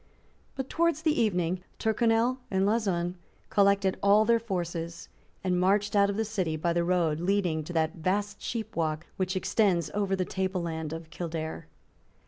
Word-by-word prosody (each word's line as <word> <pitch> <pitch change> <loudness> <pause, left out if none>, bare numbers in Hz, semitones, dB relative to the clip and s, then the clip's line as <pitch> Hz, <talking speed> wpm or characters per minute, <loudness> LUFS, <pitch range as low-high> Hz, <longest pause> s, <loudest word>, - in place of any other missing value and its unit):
But 265 -1 -3
towards 335 -1 +1
the 310 -5 +2
evening 180 -4 0 0.2
Tyrconnel 230 +3 +2
and 190 0 +1
Lauzun 190 -5 0 0.3
collected 200 -1 +3
all 205 +2 +5
their 230 +1 +4
forces, 170 -6 -4 0.3
and 180 -1 +1
marched 200 +3 +2
out 200 0 +5
of 200 - -2
the 225 - 0
city 185 -7 -1
by 170 +2 0
the 170 0 +1
road 170 -3 +1
leading 175 -3 +1
to 175 - -6
that 160 +2 0
vast 200 +5 -1
sheepwalk 170 -9 -2
which 185 0 -1
extends 185 -4 +1
over 200 -2 0
the 185 -1 -1
table 190 -1 -2
land 160 -2 -4
of 165 0 -7
Kildare. 160 -2 -5
185 Hz, 160 wpm, -28 LUFS, 170-210 Hz, 0.3 s, all